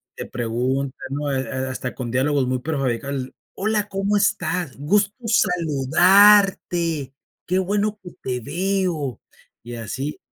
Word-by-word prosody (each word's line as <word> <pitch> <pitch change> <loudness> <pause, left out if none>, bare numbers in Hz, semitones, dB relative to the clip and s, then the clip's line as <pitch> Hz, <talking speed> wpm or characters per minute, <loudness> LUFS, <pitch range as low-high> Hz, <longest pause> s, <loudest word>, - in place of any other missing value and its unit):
te - - -6
preguntan, 125 +4 -1 0.2
¿no?, 145 +1 -2
eh, 135 - 0
eh, - - -7 0.2
hasta 130 -1 -5
con 120 -3 -5
diálogos 135 +1 +1
muy 130 0 0
prefabricados: 135 -2 -2 0.2
"Hola, 210 +1 0
¿cómo 195 +1 0
estás?, 180 -6 0
gusto 200 +8 +1
saludarte, 175 - +4 0.3
qué 185 - +1
bueno 205 +3 0
que 180 - -9
te 125 -1 -2
veo". 170 - -1 0.4
Y 120 +1 -8
así. 130 +6 -4
150 Hz, 130 wpm, -22 LUFS, 130-195 Hz, 0.4 s, saludarte